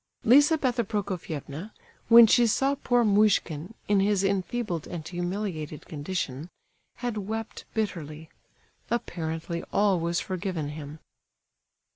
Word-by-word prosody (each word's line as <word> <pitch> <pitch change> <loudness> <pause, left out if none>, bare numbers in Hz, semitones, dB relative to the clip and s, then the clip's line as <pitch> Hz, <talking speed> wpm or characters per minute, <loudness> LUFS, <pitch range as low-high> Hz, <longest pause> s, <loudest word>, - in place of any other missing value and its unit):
Lizabetha 260 -1 +4
Prokofievna, 185 -3 -5 0.3
when 235 0 +10
she 235 +2 +4
saw 270 +5 +2
poor 245 -3 +1
Muishkin, 200 -3 +2
in 205 -1 +3
his 200 0 +2
enfeebled 195 -2 -1
and 160 -3 -6
humiliated 175 -3 -4
condition, 150 -1 -4 0.5
had 240 -3 -3
wept 220 +2 -5
bitterly. 160 -7 -3 0.6
Apparently 170 -7 -3
all 200 -3 +3
was 170 +1 0
forgiven 185 -5 -3
him. 150 0 -8
190 Hz, 105 wpm, -27 LUFS, 160-220 Hz, 0.6 s, when